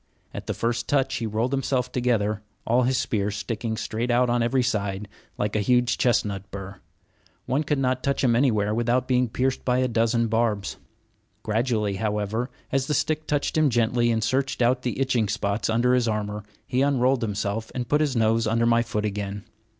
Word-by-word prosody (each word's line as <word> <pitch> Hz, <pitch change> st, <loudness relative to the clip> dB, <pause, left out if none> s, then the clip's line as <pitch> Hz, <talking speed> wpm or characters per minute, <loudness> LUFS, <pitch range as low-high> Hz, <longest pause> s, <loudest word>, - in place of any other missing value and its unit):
At -, -, -7 dB
the -, -, -2 dB
first 115 Hz, 0 st, -1 dB
touch 135 Hz, -2 st, +1 dB
he 115 Hz, -, -2 dB
rolled 110 Hz, +5 st, -1 dB
himself 130 Hz, -2 st, 0 dB
together, 110 Hz, -4 st, 0 dB, 0.2 s
all 120 Hz, +2 st, +3 dB
his 125 Hz, +1 st, +1 dB
spears 105 Hz, -4 st, -1 dB
sticking 110 Hz, +2 st, -3 dB
straight 115 Hz, +4 st, -3 dB
out 120 Hz, 0 st, +3 dB
on 120 Hz, 0 st, +2 dB
every 125 Hz, +2 st, +2 dB
side, 105 Hz, -4 st, -2 dB, 0.3 s
like 105 Hz, 0 st, -1 dB
a -, -, +2 dB
huge 125 Hz, +3 st, +2 dB
chestnut 100 Hz, -5 st, 0 dB
bur. 95 Hz, 0 st, -8 dB, 0.7 s
One 135 Hz, +4 st, 0 dB
could 150 Hz, 0 st, 0 dB
not 130 Hz, -1 st, 0 dB
touch 140 Hz, 0 st, -1 dB
him 120 Hz, -3 st, +4 dB
anywhere 110 Hz, -5 st, +2 dB
without 120 Hz, +2 st, +1 dB
being 125 Hz, -2 st, +2 dB
pierced 130 Hz, +3 st, -1 dB
by 125 Hz, -1 st, +1 dB
a 130 Hz, 0 st, +2 dB
dozen 115 Hz, 0 st, +1 dB
barbs. 110 Hz, -7 st, 0 dB, 0.7 s
Gradually, 110 Hz, -3 st, 0 dB
however, 105 Hz, +3 st, -1 dB, 0.2 s
as 135 Hz, -1 st, 0 dB
the 150 Hz, -, 0 dB
stick 155 Hz, +3 st, -1 dB
touched 145 Hz, -1 st, 0 dB
him 155 Hz, -2 st, +4 dB
gently 120 Hz, 0 st, +2 dB
and 110 Hz, -1 st, +1 dB
searched 135 Hz, +5 st, 0 dB
out 125 Hz, +1 st, +2 dB
the 125 Hz, 0 st, -3 dB
itching 125 Hz, -5 st, +1 dB
spots 100 Hz, 0 st, -1 dB
under 120 Hz, +3 st, +3 dB
his 125 Hz, -2 st, +2 dB
armor, 105 Hz, -1 st, -2 dB, 0.2 s
he 125 Hz, -, 0 dB
unrolled 135 Hz, -2 st, +2 dB
himself 105 Hz, 0 st, -2 dB
and 125 Hz, -2 st, -3 dB
put 150 Hz, +4 st, +2 dB
his 145 Hz, -4 st, 0 dB
nose 115 Hz, 0 st, +2 dB
under 115 Hz, +1 st, +2 dB
my 115 Hz, 0 st, +4 dB
foot 105 Hz, -2 st, -2 dB
again. 100 Hz, -1 st, -4 dB
115 Hz, 190 wpm, -25 LUFS, 105-125 Hz, 0.7 s, him